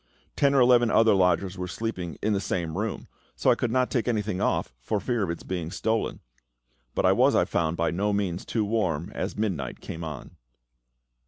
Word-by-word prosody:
Ten 140 -1 +3
or - - +5
eleven 120 -2 +5
other 110 -1 +5
lodgers 90 0 +2
were 90 - -3
sleeping 95 -5 -4
in 105 +1 +2
the 100 - 0
same 85 -4 -2
room, 110 +4 -3 0.3
so - - +3
I - - +4
could 120 - -1
not 125 +2 +1
take 120 -3 0
anything 105 -5 -1
off, - - 0
for 100 - -1
fear 120 +1 -1
of 95 - -1
its 85 - -4
being 90 -4 -4
stolen; 110 +5 -1 0.7
but - - +1
I - - +6
was, - - +4
I - - +4
found, 80 0 -1
by 85 - +1
no 100 +4 0
means 95 -3 -1
too 110 -3 -1
warm 95 -5 -1
as - - -4
midnight 105 -5 -2
came 85 - -7
on. 75 -5 -7
100 Hz, 200 wpm, -26 LUFS, 85-115 Hz, 0.7 s, I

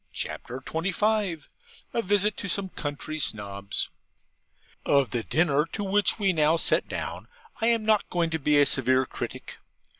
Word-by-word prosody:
CHAPTER 125 +2 -3
XXV 185 +1 -1 0.5
A 235 - +1
VISIT 205 +1 +2
TO 200 - -5
SOME 190 +1 0
COUNTRY 155 0 -5
SNOBS 100 -5 -1 0.9
Of 140 -5 +2
the 120 - -1
dinner 150 +3 +1
to 205 - -2
which 200 0 +2
we 195 -3 +2
now 155 0 +3
sat - - +1
down, - - -5 0.3
I 225 - +2
am 230 -2 +2
not 215 -1 +2
going 170 -2 0
to 160 - -1
be 145 0 +3
a 145 - +6
severe 130 -1 +2
critic. - - -7
165 Hz, 155 wpm, -26 LUFS, 140-200 Hz, 0.9 s, a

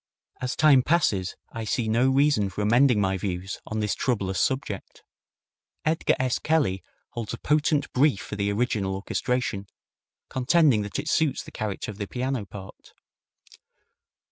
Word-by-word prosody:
As 130 0 -2
time 145 -4 +6
passes 115 - +1 0.2
I 115 - -4
see 110 +2 -1
no 120 +4 +3
reason 135 -7 +3
for 105 +2 -4
amending 120 +2 +4
my 95 -1 0
views 95 0 -4
on 110 0 -2
this 105 -1 0
troublous 100 -7 -1
subject. 130 -7 -2 0.8
Edgar 160 +2 +2
S. 130 -1 0
Kelly 145 - +1 0.3
holds 115 -3 -4
a - - -12
potent 150 -1 +1
brief 135 -5 +3
for - - -6
the 100 0 0
original 100 -3 0
orchestration, 100 0 -2 0.6
contending 135 -2 +3
that 100 -1 -4
it - - -4
suits 150 -4 +1
the - - -12
character 110 -1 -4
of 105 - -13
the 100 - -3
piano 125 -3 -3
part. 95 0 -11
115 Hz, 150 wpm, -26 LUFS, 100-135 Hz, 0.8 s, time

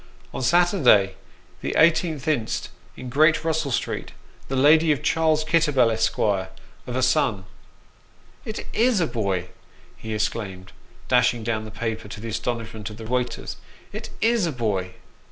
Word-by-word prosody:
On - - -4
Saturday, 130 - +4 0.5
the - - -3
18th 160 -3 +3
inst., 140 -8 -1 0.3
in 130 - -7
Great 155 +4 +3
Russell 160 -2 0
Street, 125 - -3 0.3
the 135 - -3
lady 155 +4 +5
of 150 0 -1
Charles 155 0 +2
Kitterbell, 150 -7 +3
Esq., 110 0 0
of 95 +4 -3
a 130 - +1
son." 125 -6 +1 1.0
"It 220 - -6
is 235 -2 +3
a 170 - +2
boy!" 95 - -2 0.5
he 110 -1 -6
exclaimed, 95 -4 -3 0.4
dashing 120 -2 +2
down 110 -1 -2
the - - -8
paper, 110 0 -4
to 105 - -8
the 115 +2 -6
astonishment 110 -2 -4
of 105 - -10
the 115 - -8
waiters. 120 +1 -3 0.2
" - - -26
It - - -6
is 225 -5 +2
a - - -1
boy 100 -8 -2
125 Hz, 155 wpm, -24 LUFS, 110-155 Hz, 1.0 s, lady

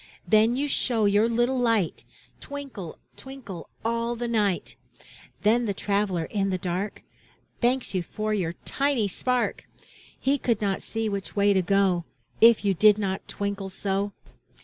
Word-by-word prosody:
Then 220 +2 +4
you 285 +3 0
show 235 -5 +1
your 205 +3 +4
little 240 +3 +1
light, 225 -8 +1 0.3
Twinkle, 275 - -7 0.2
twinkle, 250 -11 -9 0.2
all 230 +1 0
the 240 +1 -3
night. 210 -5 0 0.7
Then 230 +3 +3
the 200 - -1
traveler 200 -4 0
in 195 +3 -1
the 185 - 0
dark. 185 +3 -3 0.6
Thanks 250 0 +1
you 185 - +1
for 215 +4 -3
your 175 -5 -1
tiny 275 -6 +1
spark! 250 +6 -1 0.5
He 275 +2 +1
could 235 -4 +1
not 200 -2 -1
see 225 0 -3
which 200 -1 -4
way 200 0 +4
to 190 - +3
go, 185 -2 +2 0.4
If 225 -2 +6
you 200 - +3
did 210 +3 +5
not 195 -2 -3
twinkle 200 -1 -3
so. 195 +1 -2
210 Hz, 150 wpm, -26 LUFS, 195-235 Hz, 0.7 s, If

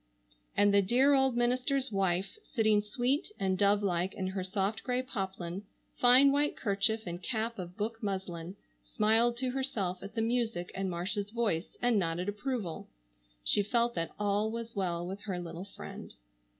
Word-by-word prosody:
And 205 0 +5
the 200 - +6
dear 255 +8 +4
old 265 -3 +3
minister's 255 +2 +1
wife, 195 - 0
sitting 220 - +2
sweet 245 - -1
and 190 -1 +1
dove 200 +2 +3
like 180 0 0
in 190 - -3
her 190 0 -2
soft 195 +2 -1
grey 250 0 0
poplin, 190 -6 -4 0.3
fine 255 +3 +7
white 290 +1 +1
kerchief, 215 +1 +1
and 175 0 -5
cap 230 +1 -2
of 180 +1 -7
book 225 +1 -3
muslin, 190 -3 -4 0.3
smiled 225 +3 +2
to 255 0 -1
herself 215 -9 -2
at 200 +3 -9
the 225 - +1
music 225 -6 -1
in 195 0 -2
Marcia's 195 +4 -2
voice 215 -7 -1
and 240 -3 +4
nodded 175 +2 -1
approval. 210 -4 -3 0.6
She 205 - +3
felt 235 +3 +1
that 165 -4 -3
all 205 +1 +1
was 230 0 -5
well 175 -3 -1
with 190 +3 -6
her 190 -4 -2
little 175 +1 -6
friend. - - -9
205 Hz, 165 wpm, -31 LUFS, 190-235 Hz, 0.6 s, fine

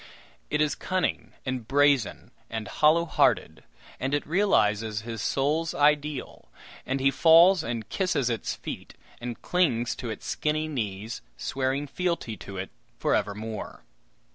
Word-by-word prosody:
It 150 0 +1
is 150 -1 +2
cunning 185 -1 -2
and 130 -4 -3
brazen 140 -4 +2 0.2
and 110 -2 -4
hollow 160 +3 +3
hearted, 160 - +1 0.4
and 135 +2 0
it 145 - -2
realizes 110 - +2
his 115 -1 -6
souls 155 +4 0
ideal, 150 -1 0 0.4
and 135 +1 0
he 135 +1 +3
falls 170 +5 +6
and 115 -1 -4
kisses 180 -10 0
its 115 -2 -2
feet, - - -8 0.2
and 120 -1 -5
clings 130 -10 +1
to 120 - -5
its 110 - -6
skinny 155 +1 -1
knees, 110 -6 -4 0.2
swearing 135 +2 -1
fealty 170 -7 -2
to 100 -1 -9
it 95 +1 -5 0.3
for - - +1
evermore! 105 +1 -3
135 Hz, 140 wpm, -27 LUFS, 115-155 Hz, 0.4 s, falls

